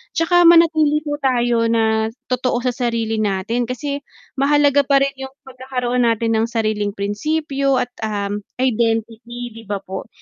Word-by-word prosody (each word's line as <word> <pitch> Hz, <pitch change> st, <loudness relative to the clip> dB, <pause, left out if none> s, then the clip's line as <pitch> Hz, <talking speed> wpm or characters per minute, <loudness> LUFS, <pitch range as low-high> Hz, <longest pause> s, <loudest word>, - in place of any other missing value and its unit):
'tsaka 350 Hz, +1 st, +4 dB
manatili 315 Hz, -3 st, +5 dB
po 290 Hz, -1 st, -4 dB
tayo 240 Hz, -4 st, +1 dB
na 220 Hz, -1 st, +1 dB, 0.2 s
totoo 250 Hz, -1 st, 0 dB
sa 250 Hz, -, +1 dB
sarili 230 Hz, -3 st, -2 dB
natin, 215 Hz, +4 st, -1 dB
kasi 280 Hz, +3 st, -4 dB, 0.4 s
mahalaga 285 Hz, 0 st, +3 dB
parin 275 Hz, 0 st, +3 dB
'yung 265 Hz, 0 st, -6 dB
pagkakaroon 250 Hz, -2 st, -2 dB
natin 225 Hz, 0 st, +1 dB
ng 225 Hz, -, +1 dB
sariling 215 Hz, -3 st, -1 dB
prinsipyo 275 Hz, +6 st, -1 dB
at, 245 Hz, -, -11 dB
um, 205 Hz, -2 st, -3 dB, 0.2 s
identity 235 Hz, 0 st, -2 dB
'di -, -, -12 dB
ba 200 Hz, -1 st, -4 dB
po? 190 Hz, 0 st, -7 dB
245 Hz, 140 wpm, -19 LUFS, 225-275 Hz, 0.4 s, manatili